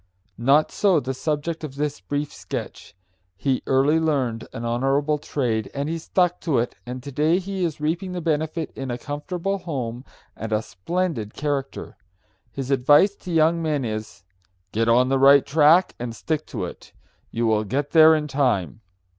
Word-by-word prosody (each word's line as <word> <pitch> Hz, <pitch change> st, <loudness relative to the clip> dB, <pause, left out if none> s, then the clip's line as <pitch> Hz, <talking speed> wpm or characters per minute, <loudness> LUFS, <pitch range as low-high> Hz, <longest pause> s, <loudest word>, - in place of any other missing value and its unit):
Not 140 Hz, +6 st, +3 dB
so 190 Hz, -6 st, +3 dB
the 130 Hz, -1 st, -4 dB
subject 155 Hz, +4 st, -3 dB
of 140 Hz, -3 st, -6 dB
this 145 Hz, 0 st, -2 dB
brief 145 Hz, 0 st, -3 dB
sketch. -, -, -7 dB, 0.4 s
He 130 Hz, +3 st, 0 dB
early 140 Hz, +4 st, +3 dB
learned 135 Hz, -8 st, -1 dB
an 115 Hz, -, -6 dB
honorable 135 Hz, +5 st, +1 dB
trade, 115 Hz, -8 st, -2 dB
and 140 Hz, +1 st, -2 dB
he 165 Hz, +1 st, -2 dB
stuck 180 Hz, +2 st, 0 dB
to 155 Hz, -6 st, 0 dB
it, 120 Hz, +1 st, 0 dB
and 125 Hz, 0 st, -6 dB
to 140 Hz, -, -7 dB
day 155 Hz, +5 st, +2 dB
he 190 Hz, 0 st, -3 dB
is 160 Hz, -3 st, -2 dB
reaping 170 Hz, +5 st, -2 dB
the 180 Hz, -, -3 dB
benefit 160 Hz, 0 st, -2 dB
in 135 Hz, -1 st, -5 dB
a 120 Hz, -, -2 dB
comfortable 175 Hz, +8 st, -3 dB
home 125 Hz, -8 st, -4 dB, 0.3 s
and 110 Hz, 0 st, -6 dB
a 110 Hz, 0 st, +1 dB
splendid 150 Hz, -, -3 dB
character. 145 Hz, -2 st, -3 dB, 0.5 s
His 135 Hz, 0 st, -5 dB
advice 145 Hz, +9 st, +5 dB
to 180 Hz, -, -8 dB
young 165 Hz, +1 st, +3 dB
men 150 Hz, -5 st, -1 dB
is, 110 Hz, -6 st, -6 dB, 0.5 s
"Get 115 Hz, +1 st, +1 dB
on 125 Hz, +2 st, +4 dB
the 135 Hz, 0 st, +2 dB
right 140 Hz, +1 st, +7 dB
track 160 Hz, +5 st, +4 dB
and 120 Hz, -1 st, -5 dB
stick 155 Hz, +5 st, -3 dB
to -, -, -4 dB
it. -, -, -11 dB, 0.4 s
You 115 Hz, +1 st, -1 dB
will 110 Hz, -1 st, +2 dB
get 140 Hz, +7 st, -2 dB
there 160 Hz, -1 st, +7 dB
in 150 Hz, -1 st, -2 dB
time." 125 Hz, -, 0 dB
145 Hz, 175 wpm, -23 LUFS, 125-160 Hz, 0.5 s, right